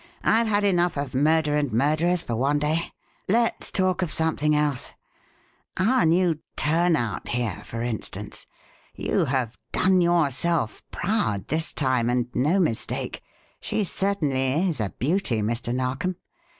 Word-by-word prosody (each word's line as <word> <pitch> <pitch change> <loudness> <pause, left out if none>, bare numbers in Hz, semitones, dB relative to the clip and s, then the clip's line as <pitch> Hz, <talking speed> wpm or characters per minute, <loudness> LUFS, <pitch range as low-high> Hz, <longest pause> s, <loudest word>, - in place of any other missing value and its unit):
I've 230 +1 +3
had 205 -1 +1
enough 175 -5 +2
of 140 -2 -3
murder 150 +2 +2
and 145 -3 0
murderers 155 +8 +2
for 115 - -3
one 140 +5 +1
day 155 +3 -1 0.4
let's 230 +3 +1
talk 185 -1 +1
of 180 - -1
something 150 -2 +1
else. 150 -3 -1 0.8
Our 195 -2 +3
new 170 -1 +2 0.2
'turnout,' 155 - +1
here, 120 -6 -2
for 115 0 -5
instance. 120 -3 -5 0.5
You - - 0
have 130 -4 -2
'done 185 -1 +3
yourself 170 -5 +1
proud' 145 - -1
this 160 +1 -1
time 130 -4 +1
and 125 0 +1
no 155 +10 +2
mistake 155 -11 -1 0.4
she 215 - -1
certainly 160 -5 0
is 155 - -3
a 105 -3 -1
beauty, 130 - 0
Mr. 115 +2 -2
Narkom. 130 +8 -1
150 Hz, 135 wpm, -25 LUFS, 125-175 Hz, 0.8 s, I've